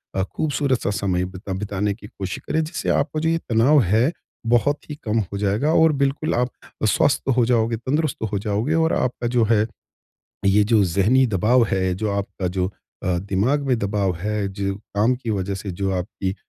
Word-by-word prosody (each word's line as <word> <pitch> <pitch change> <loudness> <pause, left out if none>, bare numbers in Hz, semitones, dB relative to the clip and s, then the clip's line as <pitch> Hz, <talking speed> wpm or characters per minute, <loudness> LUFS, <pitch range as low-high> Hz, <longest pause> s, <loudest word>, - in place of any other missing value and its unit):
अ, 95 - +1
खूबसूरत-सा 140 +1 -1
समय 95 -3 0
बिता 95 +1 -7
बिताने 100 +1 -2
की 105 -1 -12
कोशिश 95 -3 -6
करें, 160 - +1
जिससे 165 +3 -4
आपका 150 +2 +1
जो 160 +1 +1
ये 165 - +2
तनाव 125 +6 +5
है, 110 - +2 0.4
बहुत 145 +6 +1
ही 150 - -4
कम 110 0 +1
हो 100 -1 -3
जाएगा 105 +10 +1
और 160 -1 +5
बिल्कुल 140 +2 0
आप 125 +1 +1 0.4
स्वस्थ - - +2
हो 120 - +4
जाओगे, 115 -1 +2
तंदुरुस्त 135 +3 -1
हो 100 - 0
जाओगे 105 +7 -1
और 165 0 +2
आपका 125 -1 -1
जो 120 - +4
है 110 -1 +4 0.8
ये 100 +1 +4
जो 110 -2 +6
ज़हनी 100 +9 +3
दबाव 115 +4 +3
है 95 -1 +1
जो 105 +3 -2
आपका 100 -2 -3
जो 90 0 -1 0.4
अ, 90 -1 +1
दिमाग 100 +10 0
में 130 -2 +2
दबाव 100 -2 0
है, 105 +2 -2
जो 100 0 -3 0.2
काम 110 +5 +3
की 120 -2 -5
वज़ह 100 -1 -1
से 95 +1 -5
जो 95 +2 -2
आपकी 95 +1 -3
105 Hz, 190 wpm, -22 LUFS, 95-130 Hz, 0.8 s, जो